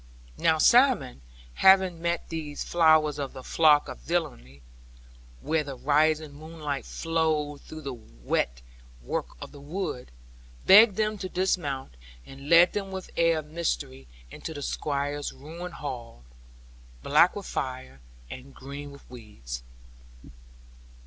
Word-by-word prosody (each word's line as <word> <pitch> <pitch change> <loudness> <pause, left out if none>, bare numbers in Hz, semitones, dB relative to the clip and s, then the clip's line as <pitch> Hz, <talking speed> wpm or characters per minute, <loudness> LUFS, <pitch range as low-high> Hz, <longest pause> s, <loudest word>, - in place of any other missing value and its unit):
Now 160 -1 +3
Simon, 235 - +4 0.3
having 190 - +4
met 170 0 -2
these 155 -3 -5
flowers 155 -3 +3
of 140 -2 -4
the 130 - -9
flock 150 -1 +4
of - - -8
villainy, 65 +2 -4 0.8
where 160 -1 0
the 140 -3 -7
rising 155 +2 +1
moonlight 150 -2 -6
flowed 155 -3 -1
through 155 - -10
the 135 -1 -4
weir - - -2 0.6
work - - -4
of - - -9
the 145 - -13
wood, 150 -4 -5 0.6
begged 210 +1 +8
them 215 0 -1
to 185 - -5
dismount; 145 - -2 0.3
and 135 +2 -11
led 170 +1 +7
them 200 -2 -3
with 190 -1 -7
an - - -19
air 165 -1 +3
of 150 -1 -7
mystery 65 - -3 0.2
into 160 - -7
the 145 - -6
Squire's 145 0 -2
ruined 170 +5 -9
hall, 120 - -7 0.8
black 155 +5 +4
with 200 -2 -6
fire, 130 - -5 0.3
and 130 - -11
green 140 +2 -8
with 140 0 -15
weeds. 65 - -9
150 Hz, 135 wpm, -27 LUFS, 135-170 Hz, 0.8 s, begged